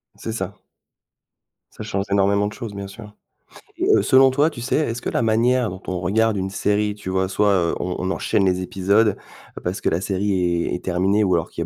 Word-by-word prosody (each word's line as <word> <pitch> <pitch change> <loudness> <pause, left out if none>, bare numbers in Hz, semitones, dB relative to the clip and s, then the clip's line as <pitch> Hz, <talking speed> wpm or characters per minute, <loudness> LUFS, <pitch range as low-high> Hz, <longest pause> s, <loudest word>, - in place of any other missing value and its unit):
C'est 115 - -6
ça. 95 -3 -5 1.2
Ça - - -8
change 100 -2 -2
énormément 100 +1 +2
de 105 - -6
choses, 115 -5 -7
bien 100 0 -6
sûr. 105 +1 -11 0.6
Et - - -1
heu, - - +3
selon 130 0 +5
toi, 145 +4 +3
tu 120 - -9
sais, 120 - -1
est-ce 125 -6 -1
que - - -3
la - - 0
manière 120 +2 +2
dont 95 +1 -8
on 90 -1 -2
regarde 105 +4 +1
une 95 0 -2
série, 105 +2 0
tu 105 -3 -7
vois, 95 0 0
soit, 100 +2 +2
heu, 85 -3 +1
on 90 - -3
on 95 +1 -1
enchaîne 100 0 0
les 90 -1 +1
épisodes 100 +3 +1 0.5
parce 90 +2 -3
que - - +1
la 85 - -1
série 100 +1 -1
est 85 -2 0
est 90 - -4
terminée 95 +4 +1
ou 95 -2 +2
alors 85 - -1
qu'il - - -6
y - - -1
100 Hz, 225 wpm, -21 LUFS, 95-110 Hz, 1.2 s, selon